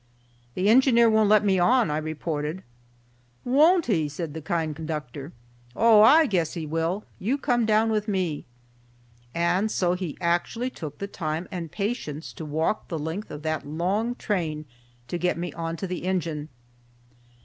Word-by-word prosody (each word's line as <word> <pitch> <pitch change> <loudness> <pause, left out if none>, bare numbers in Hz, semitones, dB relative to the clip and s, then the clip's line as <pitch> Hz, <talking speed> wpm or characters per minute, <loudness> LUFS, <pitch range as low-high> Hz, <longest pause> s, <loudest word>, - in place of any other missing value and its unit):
"The 185 - 0
engineer 235 0 +5
won't 220 -1 +3
let 210 0 +5
me 190 -2 +3
on," 230 0 +3
I 150 - 0
reported. 155 +1 -4 0.8
"Won't 310 +7 +4
he?" 160 -9 +1
said 150 +1 -5
the 160 - -6
kind 160 -1 -2
conductor. 150 -2 -6 0.4
"Oh! 225 -2 +6
I 305 +9 +7
guess 180 - 0
he 165 -2 -4
will. 165 +6 -2
You 245 +9 0
come 245 -5 +1
down 220 +1 +3
with 215 0 -1
me." 185 -7 -1 0.9
And 175 +5 +1
so 180 -4 +1
he 180 -4 -4
actually 180 +8 -1
took 150 - -8
the 200 - -4
time 165 -3 -4
and 170 -4 -5
patience 195 -8 -4
to 160 - -7
walk 160 +8 -1
the 165 - -3
length 160 +7 -4
of 150 0 -8
that 155 -2 -2
long 195 +10 -1
train 160 -10 -2 0.4
to 175 - -3
get 180 -1 0
me 175 -2 -4
on 165 0 -4
to 195 - -4
the 180 -2 -5
engine. 165 -5 -2
175 Hz, 165 wpm, -25 LUFS, 155-215 Hz, 0.9 s, I